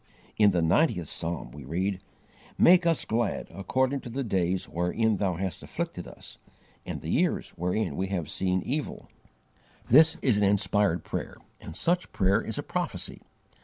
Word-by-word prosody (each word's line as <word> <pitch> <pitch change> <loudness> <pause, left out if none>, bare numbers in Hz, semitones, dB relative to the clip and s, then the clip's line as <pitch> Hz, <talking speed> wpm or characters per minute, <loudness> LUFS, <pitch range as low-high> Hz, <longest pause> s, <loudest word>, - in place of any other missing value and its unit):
In 105 -1 +5
the 90 -3 +1
ninetieth 90 - +2
psalm 85 +1 -5
we 75 -1 -10
read: 90 +7 -2 0.6
"Make 175 0 +6
us 165 -2 +2
glad 115 -1 -1
according 130 +8 0
to 125 - -9
the 135 +4 -3
days 95 -4 0
wherein 100 +6 0
Thou 95 -3 0
hast 95 +1 -4
afflicted - - -5
us - - -12 0.5
And - - -4
the - - -4
years - - +1
wherein 90 -2 -1
we 95 +4 -1
have 90 -5 -2
seen 95 -1 -1
evil." 145 +3 -2
(Psalm - - -15
xc. - - -33
15.) 125 - +7
This 160 0 +4
is 120 -6 +3
an 105 - +2
inspired 100 -3 +2
prayer, - - -5 0.2
and 80 - -10
such 175 +1 0
prayer 100 +2 +2
is 110 - -4
a - - -2
prophecy. - - -3
100 Hz, 175 wpm, -28 LUFS, 90-120 Hz, 0.6 s, 15